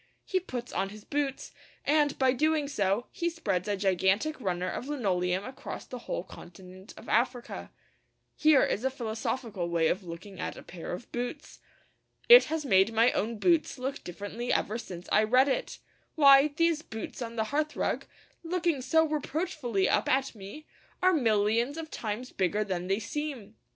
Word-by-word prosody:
He 375 - +1
puts 250 -9 -6
on 195 +1 -1
his 210 +1 -11
boots, 285 -2 -2 0.3
and, 295 -1 +2
by 260 -1 +3
doing 305 +2 +1
so, 205 -3 0
he 340 0 -1
spreads 205 - -2
a 205 -1 0
gigantic 195 - +1
runner 180 -3 -1
of 250 - -4
linoleum 190 -9 0
across 260 +1 -7
the 250 - -7
whole - - -2
continent 185 +2 -13
of - - -12
Africa. 240 +2 -1 0.7
Here 305 -3 +5
is 220 - -1
a 265 - +2
philosophical 225 -5 -3
way 165 -2 +2
of 185 - -1
looking 185 +3 -9
at - - -4
a - - -10
pair 170 -2 -8
of 180 +7 -7
boots! 245 +5 -5 0.7
It 485 +1 +10
has 315 -1 -3
made 195 -3 +4
my 230 +2 +5
own 225 +2 -2
boots 330 - +2
look 265 +2 -4
differently 205 +7 -5
ever 220 +3 0
since 180 -5 -8
I - - +5
read 255 +5 +4
it. 270 - -2 0.4
Why, 280 -2 +7
these 320 +1 +1
boots 225 -3 -7
on 230 -1 -5
the 220 -1 -2
hearthrug, 305 +1 -1 0.4
looking 335 -4 0
so 320 +5 +3
reproachfully 295 - -1
up - - +1
at 265 +1 +1
me, 210 +9 -10 0.4
are 370 0 +5
millions 230 0 +2
of 320 -1 -6
times 225 +3 -4
bigger 200 +3 0
than 180 -3 -3
they 195 +1 +1
seem! 245 -2 -5
240 Hz, 170 wpm, -29 LUFS, 195-290 Hz, 0.7 s, It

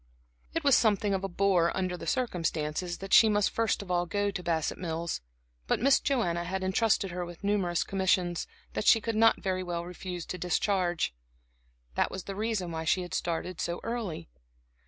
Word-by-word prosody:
It 330 - 0
was 280 -3 +6
something 205 -2 +3
of 190 0 -1
a - - 0
bore, 180 -2 +2
under 185 -1 -1
the - - -8
circumstances, 175 - -1
that 195 0 -5
she 220 - +8
must 205 -1 +2
first 225 -2 0
of 185 - -7
all 175 0 +1
go 205 +3 0
to 185 - -4
Bassett 165 -3 -1
Mills, 165 - -3 0.5
but - - +1
Miss 270 +3 +5
Joanna 175 -11 0
had 190 +2 -3
intrusted 195 0 +2
her 180 0 -3
with 175 +1 -10
numerous 195 -4 +1
commissions, 185 -2 0 0.3
that - - -2
she 225 - +7
could 225 +1 -3
not 225 +1 +4
very 185 -2 0
well 170 -1 -3
refuse 180 -1 -6
to 180 - -6
discharge. 180 - 0 0.8
That - - +1
was 190 - -6
the 195 - -6
reason 210 -4 -2
why 160 0 -3
she 180 +3 +1
had 175 - -8
started 170 +1 -2
so 170 0 -2
early. 225 - -4
185 Hz, 190 wpm, -29 LUFS, 175-205 Hz, 0.8 s, she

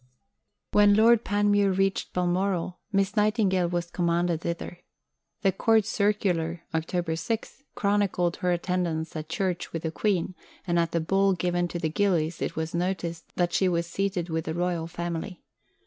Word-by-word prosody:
When 205 -1 +6
Lord 225 +1 +5
Panmure 205 0 +2
reached 195 0 0
Balmoral, 180 0 -1
Miss 195 0 +1
Nightingale 210 -4 +2
was 175 -1 -2
commanded 170 -1 0
thither. 170 +1 -4 0.6
The 195 - +4
Court 220 +3 +3
Circular 185 -6 0
(Oct. 165 0 -1
6) 230 +5 -4
chronicled 200 -4 +1
her 180 - 0
attendance 175 -2 -1
at 155 0 -5
church 180 +1 -2
with 165 - -4
the 160 - -1
Queen, 185 -1 0 0.3
and 175 -1 +1
at 170 -1 +1
the 170 0 0
ball 195 +4 +2
given 175 0 0
to 175 - -5
the 165 -2 -1
gillies 170 -3 0
it - - -2
was 160 0 -3
noticed 170 -1 -3
that 175 -1 0
she 190 - +3
was 170 -1 0
seated 185 0 -2
with 160 -1 -2
the 160 - -3
Royal 175 -2 -1
Family. 175 +1 -5
175 Hz, 160 wpm, -27 LUFS, 170-195 Hz, 0.6 s, When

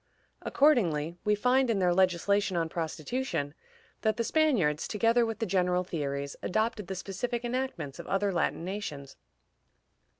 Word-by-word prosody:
Accordingly, 175 - +2
we 210 0 +3
find, 250 +4 +2
in 225 - +2
their 180 -2 +3
legislation 190 +1 +2
on 165 -1 0
prostitution, 160 - -3 0.5
that 220 -1 +1
the 230 - +1
Spaniards, 230 - +2
together 230 +2 +2
with 225 -2 -3
the 225 - -1
general 180 -2 +1
theories, 140 -5 -3
adopted 215 0 -1
the 190 - -4
specific 235 +6 -3
enactments 245 - -3
of - - -8
other 195 0 0
Latin 170 -1 -1
nations. 150 -9 -5
195 Hz, 140 wpm, -29 LUFS, 170-230 Hz, 0.5 s, we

